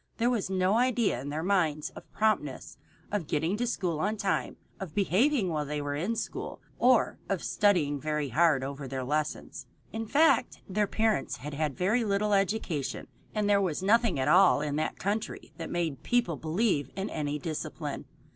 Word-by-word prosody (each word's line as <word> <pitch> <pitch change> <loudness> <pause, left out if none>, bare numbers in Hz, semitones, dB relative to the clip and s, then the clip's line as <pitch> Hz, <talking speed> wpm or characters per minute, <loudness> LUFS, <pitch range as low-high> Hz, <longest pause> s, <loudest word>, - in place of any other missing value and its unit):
There 235 +2 +2
was 215 -6 -1
no 190 +3 +2
idea 240 - +1
in 140 - -6
their 155 +2 -3
minds 165 -6 +1
of - - -13
promptness, 210 -11 -1 0.3
of 200 -7 -2
getting 160 +6 0
to 245 +2 -1
school 180 -9 -1
on 210 +5 0
time, 200 -1 -1 0.2
of 185 -6 -7
behaving 205 - +2
while 155 -3 -1
they 150 +1 -3
were 145 0 -3
in 180 +11 -1
school, - - -4 0.2
or 250 -2 +3
of 195 -3 -1
studying 160 -9 +2
very 150 -2 -1
hard 150 0 +3
over 140 0 -5
their 130 0 -3
lessons. 150 +3 -3 0.3
In 225 0 -3
fact, 310 +7 +3
their 205 +1 +1
parents 220 0 0
had 150 +3 -7
had 150 -2 -2
very 215 +7 +2
little 205 0 +1
education, 195 -8 -1 0.3
and 210 -1 +1
there 200 -1 +4
was 185 -2 -1
nothing 220 -3 +3
in 130 - 0
all 180 -5 +6
that 150 +1 -2
country 205 +3 -3
that 165 - -5
made 165 -5 -2
people 240 -9 +1
believe 160 - 0
in 195 +1 -2
any 150 -1 -2
discipline. 155 +1 -5
180 Hz, 175 wpm, -29 LUFS, 150-210 Hz, 0.3 s, all